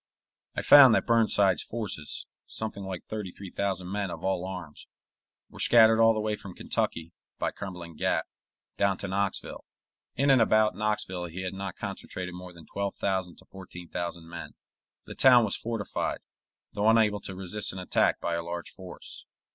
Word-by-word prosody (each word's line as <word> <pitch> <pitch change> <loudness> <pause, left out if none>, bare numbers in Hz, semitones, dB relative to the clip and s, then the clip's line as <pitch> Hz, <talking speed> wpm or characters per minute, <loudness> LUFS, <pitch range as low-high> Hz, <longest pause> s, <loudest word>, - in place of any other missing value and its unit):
I - - -2
found 135 -5 +9
that - - +1
Burnside's 105 -6 +3
forces, 105 -10 -5 0.2
something 110 -2 -5
like 95 -2 -5
thirty 105 -3 -5
three 95 0 -10
thousand 95 -2 -2
men 100 -1 -2
of 85 -1 -7
all 95 -2 0
arms, 90 -5 -8 0.6
were - - -14
scattered 110 -1 +6
all 115 0 +6
the - - -1
way 105 0 -1
from 100 -3 -10
Kentucky, 85 +1 -2 0.2
by - - -1
Cumberland 90 -5 -8
Gap, - - +1 0.5
down 100 -2 +2
to 100 - -5
Knoxville. 100 +1 -2 0.5
In 140 0 +3
and 130 -3 +6
about 110 -1 +3
Knoxville 105 -4 -2
he 90 +2 -6
had 95 - -3
not 95 -1 -5
concentrated 95 -3 -5
more 90 0 -9
than 85 -2 -14
twelve 100 0 -3
thousand 95 -3 -1
to - - -18
fourteen 90 -2 -11
thousand 85 -1 -4
men. 85 0 -8 0.5
The - - -8
town 125 -3 +6
was 100 - -1
fortified, 115 -3 -3 0.5
though 105 +1 +2
unable 110 -2 +4
to 95 - -7
resist 95 +2 -2
an - - -9
attack 90 - +1
by 85 - -2
a 85 - -1
large 85 +1 -6
force. 90 -2 -11
95 Hz, 175 wpm, -28 LUFS, 90-105 Hz, 0.6 s, found